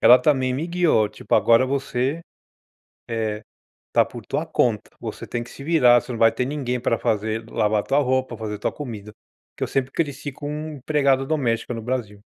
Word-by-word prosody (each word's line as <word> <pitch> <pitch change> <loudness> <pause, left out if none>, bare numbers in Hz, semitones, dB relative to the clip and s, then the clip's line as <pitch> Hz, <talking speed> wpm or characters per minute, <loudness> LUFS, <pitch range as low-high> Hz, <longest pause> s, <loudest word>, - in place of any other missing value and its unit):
ela 125 - +8
também 130 -4 +2
me 150 +6 -2
guiou, 170 -11 +2
tipo, 105 0 -2
"agora 115 +2 +5
você, 135 +2 -1 0.9
eh, 110 -2 -2 0.5
tá - - +5
por - - -10
tua - - -1
conta, - - 0
você - - -6
tem 120 - -3
que - - -14
se 135 - -10
virar, 125 -7 +5
você 125 - -12
não 115 - -5
vai 115 0 +6
ter 125 - -1
ninguém 130 -3 -2
pra 115 -1 +1
fazer 110 +1 -1
lavar 105 -1 +1
tua 140 - +2
roupa, 130 -3 0
fazer 105 -1 -5
tua - - -1
comida". 110 -7 -7 0.4
Que - - -9
eu - - -5
sempre 135 -1 -1
cresci 145 -3 -2
com 145 +2 -7 0.3
empregada 140 -1 +2
doméstica 125 -6 0
no 115 - -5
Brasil. 110 -4 -3
125 Hz, 190 wpm, -23 LUFS, 115-140 Hz, 0.9 s, ela